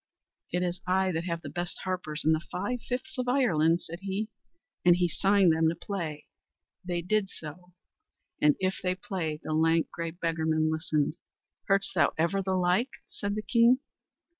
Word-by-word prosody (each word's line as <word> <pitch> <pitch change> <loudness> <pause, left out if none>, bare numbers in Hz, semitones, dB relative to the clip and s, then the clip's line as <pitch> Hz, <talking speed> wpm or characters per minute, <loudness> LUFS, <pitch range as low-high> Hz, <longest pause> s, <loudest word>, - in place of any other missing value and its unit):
"It 180 +1 0
is 180 +1 -2
I 190 +1 +2
that 165 0 -2
have 170 -1 -3
the - - -6
best 175 0 -4
harpers 180 -5 -2
in 160 - +5
the 160 - +3
five 205 +7 -2
fifths 260 +3 -3
of 250 - -1
Ireland," 175 - +3
said 170 +1 -7
he, 200 +3 -2 0.5
and 175 -1 +7
he 175 0 +2
signed 195 0 +4
them 160 0 +3
to 165 - -2
play. 165 -6 -5 0.6
They 175 -1 -2
did 205 +1 +1
so, 180 +3 -10 0.7
and 150 -1 +5
if 190 0 0
they 185 0 0
played, 180 -8 -4
the 155 - -3
lank, 165 +1 +2
grey 170 0 -3
beggarman 160 -2 0
listened. 160 -1 0 0.5
"Heardst 195 0 +3
thou - - +3
ever 170 +5 +1
the 190 0 -1
like?" 185 +8 +2 0.2
said 205 0 -3
the 215 - -3
king. 235 +4 +5
180 Hz, 175 wpm, -29 LUFS, 160-195 Hz, 0.7 s, and